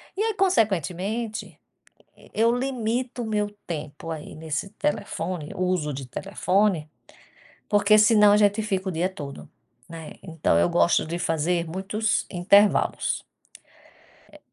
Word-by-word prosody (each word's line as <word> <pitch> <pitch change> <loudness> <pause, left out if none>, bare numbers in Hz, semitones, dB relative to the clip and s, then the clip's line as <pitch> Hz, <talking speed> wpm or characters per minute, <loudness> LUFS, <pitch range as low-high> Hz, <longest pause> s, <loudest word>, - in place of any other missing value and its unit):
E 405 - -2
aí, 445 -1 0
consequentemente, 215 - -1 0.7
eu 230 +2 +2
limito 245 -1 -2
o - - -4
meu 210 -1 -1 0.2
tempo, 155 -1 -6
aí, 155 -1 -8
nesse 160 +4 -4
telefone 180 - -3
uso 180 -5 0
de 135 -1 -6
telefone, 185 +2 0 0.8
porque 210 0 +5
senão 210 -1 +6
a - - +6
gente 205 +1 +3
fica 195 -2 -2
o - - -2
dia 175 +3 0
todo, 140 -6 -8 0.4
né. 165 -2 -9
Então 160 - 0
eu 85 +1 +3
gosto 85 - +3
de 170 +2 -3
fazer 170 +1 0
muitos 195 +5 -1
intervalos. 200 +3 +3 1.1
Eh - - -14
190 Hz, 130 wpm, -25 LUFS, 165-215 Hz, 1.1 s, senão